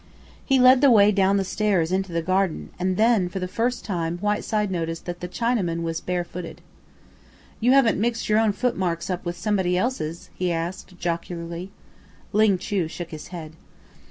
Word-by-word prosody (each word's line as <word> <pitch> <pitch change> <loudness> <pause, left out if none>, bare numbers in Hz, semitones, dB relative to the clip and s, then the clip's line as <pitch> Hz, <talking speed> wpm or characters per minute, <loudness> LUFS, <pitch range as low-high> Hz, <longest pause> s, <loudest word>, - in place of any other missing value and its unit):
He 270 - +3
led 255 +1 +7
the 280 - +7
way 210 -3 +6
down 195 0 +3
the 195 - +1
stairs 190 -4 0
into 190 0 -1
the 165 0 -1
garden, 185 0 0
and 185 0 0
then 220 -5 +3
for 185 - -6
the 185 -1 -2
first 235 +6 -1
time 170 -4 -2
Whiteside 210 +1 -1
noticed 165 -2 -3
that 175 0 -5
the 180 - -5
Chinaman 185 -7 -1
was 165 0 -3
bare 180 -1 -1
footed. 175 0 -8 1.0
"You 245 +3 +4
haven't 245 -7 +4
mixed 235 0 -1
your 215 0 +3
own 220 -1 +3
footmarks 185 -7 -1
up 180 - -3
with 175 0 -3
somebody 190 -4 0
else's?" 175 -8 -3
he 180 -1 -1
asked 170 +2 -4
jocularly. 170 +1 -4 0.6
Ling 210 -2 +4
Chu 185 -2 -1
shook 170 +1 -7
his 155 -2 -8
head. 160 -4 -8
185 Hz, 180 wpm, -24 LUFS, 170-215 Hz, 1.0 s, led